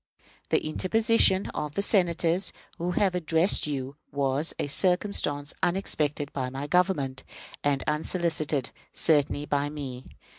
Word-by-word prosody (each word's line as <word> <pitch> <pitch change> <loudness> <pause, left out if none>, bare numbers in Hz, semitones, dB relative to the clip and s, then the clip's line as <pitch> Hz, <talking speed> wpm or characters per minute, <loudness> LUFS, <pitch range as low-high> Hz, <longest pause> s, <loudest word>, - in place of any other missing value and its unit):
The - - +1
interposition 200 +3 +3
of 150 -1 -4
the 200 - 0
Senators 175 -2 +2 0.3
who 175 +1 -1
have 195 -1 +2
addressed 165 0 +2
you 140 -1 -4
was 140 +2 0
a - - -1
circumstance 155 -3 +1
unexpected 150 -6 -1
by 130 -2 -2
my 135 +2 -5
government, 145 -6 +1 0.4
and 140 -2 +1
unsolicited 155 -3 -1 0.2
certainly 145 -2 +2
by 145 0 0
me. 135 -4 -7
150 Hz, 120 wpm, -27 LUFS, 145-180 Hz, 0.4 s, interposition